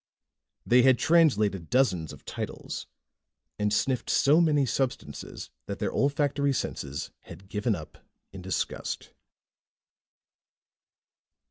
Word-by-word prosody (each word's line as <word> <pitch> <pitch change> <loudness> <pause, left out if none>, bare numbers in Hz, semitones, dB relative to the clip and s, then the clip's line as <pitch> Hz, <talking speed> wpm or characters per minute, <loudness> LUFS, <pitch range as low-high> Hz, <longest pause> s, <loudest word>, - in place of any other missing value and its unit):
They 125 +1 +6
had 130 0 +5
translated 110 - +3
dozens 95 - +2
of - - -13
titles - - -5 0.7
and 105 0 +1
sniffed 125 +3 0
so 150 +4 +5
many 150 -4 +3
substances 130 +1 -3 0.2
that - - -4
their - - -2
olfactory 140 0 +1
senses 70 - -4
had 95 - -12
given 105 +2 0
up 80 -3 -10 0.3
in 95 0 -9
disgust. 95 +1 -3
125 Hz, 105 wpm, -28 LUFS, 100-140 Hz, 0.7 s, They